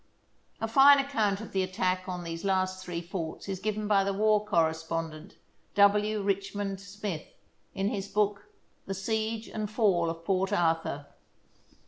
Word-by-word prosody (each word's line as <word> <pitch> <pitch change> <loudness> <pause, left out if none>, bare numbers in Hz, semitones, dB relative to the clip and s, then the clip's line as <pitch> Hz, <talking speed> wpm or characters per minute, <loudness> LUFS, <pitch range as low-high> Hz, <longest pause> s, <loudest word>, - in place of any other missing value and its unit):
A 225 - -1
fine 275 +5 +8
account 225 -8 0
of 220 - -8
the 190 - +1
attack 185 0 -1
on 180 -1 -4
these 165 0 -5
last 185 -1 0
three 175 -2 -4
forts 170 -1 -5
is 190 -2 -3
given 210 +1 -2
by 200 -2 +4
the 200 0 -1
war 210 0 +3
correspondent, 165 -2 -1 0.4
W. 205 +1 +4
Rich 200 0 -1
mond 195 -1 -3
Smith, 200 -4 -5 0.5
in 195 +1 0
his 195 -1 -3
book, 205 0 0 0.2
" - - -40
The 195 - -3
Siege 220 +3 -2
and 215 -1 -4
Fall 195 -7 +2
of 165 0 -6
Port 190 +1 +1
Arthur." 165 -6 0
195 Hz, 160 wpm, -29 LUFS, 180-210 Hz, 0.5 s, fine